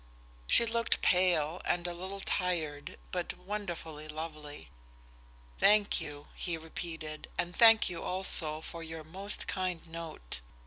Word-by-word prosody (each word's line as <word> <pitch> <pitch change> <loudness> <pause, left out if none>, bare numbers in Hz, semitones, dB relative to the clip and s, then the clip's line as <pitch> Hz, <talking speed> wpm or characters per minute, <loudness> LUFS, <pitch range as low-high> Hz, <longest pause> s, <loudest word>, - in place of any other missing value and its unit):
She 235 - +6
looked 230 0 +1
pale 175 -2 +3
and 175 0 0
a 175 - -1
little 190 +3 -6
tired, 160 -8 -1
but 180 -1 -3
wonderfully 175 -6 -5
lovely. 155 - -7 0.9
"Thank 210 0 +5
you," 145 0 -7
he 170 -2 -3
repeated, 160 -1 -6
"and 175 +1 -2
thank 225 -1 +7
you 175 - -4
also 165 -4 +3
for 165 +1 -7
your 160 -1 -7
most 190 +6 -3
kind 185 -3 -2
note." 165 - -6
170 Hz, 130 wpm, -32 LUFS, 155-185 Hz, 0.9 s, thank